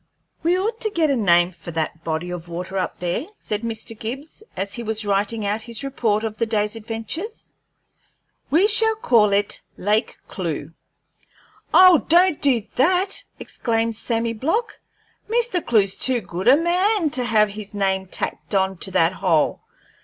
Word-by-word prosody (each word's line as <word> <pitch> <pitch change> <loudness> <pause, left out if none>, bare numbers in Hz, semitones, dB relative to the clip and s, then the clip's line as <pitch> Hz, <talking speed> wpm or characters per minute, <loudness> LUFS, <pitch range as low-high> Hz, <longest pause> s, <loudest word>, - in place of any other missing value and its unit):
"We 345 +2 +2
ought 445 +5 -2
to 435 - +2
get 325 -7 +1
a - - +2
name 175 -5 +3
for 170 -1 -12
that 160 0 -3
body 165 +2 -3
of 175 -1 -6
water 180 +3 -6
up 185 - -3
there," 180 - -2
said 210 0 -3
Mr. 225 0 -4
Gibbs, 265 - -7 0.2
as 200 +1 -3
he 235 - -4
was 220 -1 -3
writing 205 +2 -1
out 210 +2 -1
his 230 +2 -6
report 225 -6 0
of 220 -1 -4
the 230 - +1
day's 210 -1 0
adventures. 225 - -6 1.0
"Shall 440 +7 +4
we 440 - -26
call 215 - +4
it 200 +1 0 0.2
'Lake 210 +4 0
Clewe'?" - - -4 1.0
"Oh, 365 -3 +7
don't 345 -1 +4
do 255 -6 +2
that!" 365 +8 +3 0.2
exclaimed 225 -1 -1
Sammy 230 +1 +1
Block. 330 - -2 0.5
"Mr. 460 -6 +1
Clewe's 200 -4 +2
too 255 -2 0
good 180 -1 -5
a 265 +3 +7
man 355 +1 +1
to 255 - 0
have 215 -3 +3
his 210 0 -8
name 190 -1 0
tacked 200 - -3
on 190 -1 +1
to 190 - -1
that 180 -2 +2
hole. 170 -6 +1
225 Hz, 165 wpm, -22 LUFS, 200-315 Hz, 1.0 s, Oh